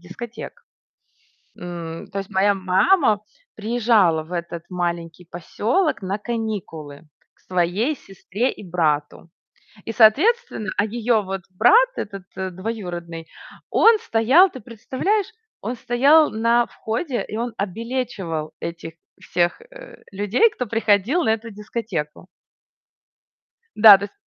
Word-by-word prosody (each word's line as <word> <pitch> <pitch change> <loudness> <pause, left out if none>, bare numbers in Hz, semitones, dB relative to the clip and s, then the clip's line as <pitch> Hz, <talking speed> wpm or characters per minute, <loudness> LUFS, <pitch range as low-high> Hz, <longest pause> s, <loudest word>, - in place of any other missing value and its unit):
дискотек. 240 - -9 0.9
М, 170 -2 -7
то 200 - -5
есть, 195 -1 -6
моя 200 +1 +3
мама 205 - +3 0.4
приезжала 215 -7 +2
в 160 - -14
этот 170 -1 -5
маленький 175 -1 -4
посёлок 220 - -1
на 190 +2 -2
каникулы, 205 -11 -5 0.3
к - - -34
своей 185 - 0
сестре 200 +5 -3
и - - -12
брату. 165 -3 -1 0.6
И, 225 - -3
соответственно 230 - +3
А, 205 - +2
её 225 0 0
вот 190 0 -5
брат, 460 - +5
этот, 195 -2 -6
э, 190 0 -3
двоюродный, 175 -5 -6 0.4
он 455 -1 +5
стоял, 305 - +4
ты 260 - -10
представляешь, 265 - -2 0.3
он 235 +5 -4
стоял 280 +7 +4
на 230 +2 +2
входе, 240 +4 -3
и 215 - -5
он 235 0 -3
обилечивал 200 -7 -4
этих 170 -1 -6 0.3
всех, 175 - -1
э, - - -14
людей, 205 - +2
кто 250 - -4
приходил 225 - +2
на 225 - +1
эту 225 +1 -6
дискотеку. 205 -7 -5 1.5
Да, 210 -2 +10
то 200 - -5
есть 205 - -10
210 Hz, 125 wpm, -22 LUFS, 180-240 Hz, 1.5 s, Да